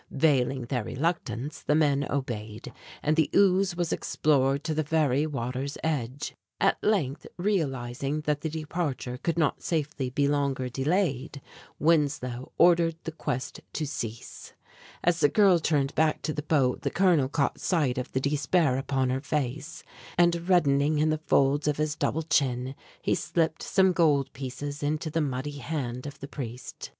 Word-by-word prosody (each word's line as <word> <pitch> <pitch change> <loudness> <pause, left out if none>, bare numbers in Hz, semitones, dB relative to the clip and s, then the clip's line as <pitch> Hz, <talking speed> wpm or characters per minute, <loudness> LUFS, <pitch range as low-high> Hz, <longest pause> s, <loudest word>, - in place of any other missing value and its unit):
Veiling 135 -3 +2
their 120 -1 -2
reluctance 140 -2 -3
the 150 - +1
men 145 -3 +3
obeyed, 110 -6 -4 0.3
and 155 +1 +2
the 160 -2 +2
ooze 190 -2 +4
was 175 -1 -1
explored 140 -1 +1
to 160 - -1
the 155 - +1
very 150 -2 +1
water's 135 0 -3
edge. 140 -4 -2 0.3
At - - +2
length, 165 -10 0
realizing 140 -7 -1
that 150 -1 -1
the 160 - -2
departure 150 -5 -3
could 170 -1 -1
not 160 -4 +1
safely 150 -5 -2
be 140 +2 +1
longer 140 -3 0
delayed, 140 0 -1 0.4
Winslow 145 -6 +1
ordered 170 -1 +5
the 165 - -4
quest 130 -5 -4
to 155 - -2
cease. 115 -5 -6 0.5
As 170 -1 +2
the 145 - +5
girl 195 -1 +5
turned 145 -3 +1
back 155 -1 +1
to 155 - -1
the 150 - -3
boat 145 -4 +1
the - - -1
colonel 175 -8 +3
caught 145 -1 0
sight 145 -9 +1
of 125 - -5
the 130 - 0
despair 140 0 +1
upon 135 -2 0
her 130 +1 -1
face; 150 +1 -3 0.3
and 175 0 +2
reddening 150 -4 +3
in 155 +1 +2
the 155 0 -1
folds 140 +2 +3
of 150 - +1
his 150 0 -1
double 160 +1 -1
chin 130 -4 +1 0.3
he - - +2
slipped 160 -1 0
some 190 -1 +3
gold 145 -6 +2
pieces 140 +2 -6
into 155 +2 -1
the 165 - 0
muddy 145 +1 -3
hand 130 -3 -4
of 140 - -9
the 140 - -6
priest. 125 -4 -7
145 Hz, 160 wpm, -27 LUFS, 130-160 Hz, 0.5 s, ordered